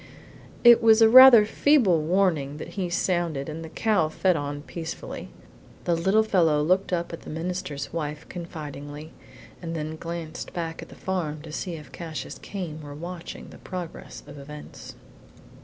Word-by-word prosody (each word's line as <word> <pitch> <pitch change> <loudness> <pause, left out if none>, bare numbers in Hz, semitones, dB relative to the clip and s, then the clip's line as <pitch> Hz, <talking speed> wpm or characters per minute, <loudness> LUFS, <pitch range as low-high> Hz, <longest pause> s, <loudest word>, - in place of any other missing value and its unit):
It 240 -1 +8
was 225 0 +6
rather 245 -1 +10
a - - -2
feeble 220 - +3
warning 160 -4 +1
that - - -7
he 185 -3 -3
sounded 170 -5 -1
and 160 +1 -6
the 160 - -8
cow 175 -3 +1
fed 180 +3 +1
on 145 -1 -4
peacefully. 165 0 -7 0.5
The 175 - +1
little 190 +6 +3
fellow 165 -8 +2
looked 185 +5 +1
up 170 -1 -2
at 165 - -7
the - - -11
minister's 160 -3 -4
wife 150 -2 -4
confidingly, 150 -3 -8 0.5
and 165 -1 -5
then 155 0 -4
glanced 165 -1 -6
back 165 -2 -4
at - - -11
the - - -12
farm 155 -5 -3
to 160 - -9
see 170 +2 -4
if 150 -2 -11
Cassius 165 -2 -7
Came 175 -6 -6
were 145 -1 -9
watching 170 +2 -8
the - - -13
progress 180 -3 -8
of 145 - -11
events. 150 +1 -10
165 Hz, 165 wpm, -25 LUFS, 150-185 Hz, 0.5 s, rather